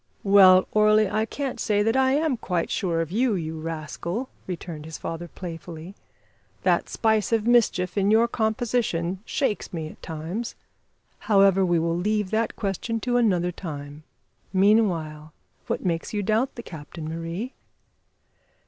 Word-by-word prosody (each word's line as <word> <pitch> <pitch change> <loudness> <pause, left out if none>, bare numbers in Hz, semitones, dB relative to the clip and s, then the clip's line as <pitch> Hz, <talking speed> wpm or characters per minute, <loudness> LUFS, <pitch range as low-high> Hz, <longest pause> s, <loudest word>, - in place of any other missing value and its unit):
"Well, 190 -2 +7
Orley, 215 0 +4
I 215 +3 0
can't 275 -1 -4
say 205 -2 +1
that 225 +3 +1
I 265 0 +3
am 300 -1 +1
quite 180 -7 -2
sure 170 -5 0
of 165 0 -4
you, 230 +2 +2
you 160 -2 -4
rascal," 165 - -4 0.2
returned 170 -4 -6
his 160 0 -7
father 165 +1 -5
playfully. 170 0 -8 0.7
"That - - +2
spice 220 -2 +1
of 225 -2 +2
mischief 220 -7 +3
in 200 +1 +2
your 225 +2 +5
composition 220 -6 -1
shakes 240 -7 -1
me 160 -3 -4
at - - -15
times. 165 +9 -5 0.7
However, 195 -2 +5
we 175 -2 +2
will 165 +1 0
leave 210 +2 0
that 225 +1 0
question 215 +3 -2
to 245 +1 +1
another 180 -7 +2
time. 145 -4 -7 0.5
Meanwhile, 175 -7 +2 0.3
what - - -2
makes 170 +3 -2
you 205 - 0
doubt 220 +7 +1
the 235 - -7
captain, 155 -1 -8
Marie?" 165 - -5
190 Hz, 150 wpm, -25 LUFS, 165-220 Hz, 0.7 s, Well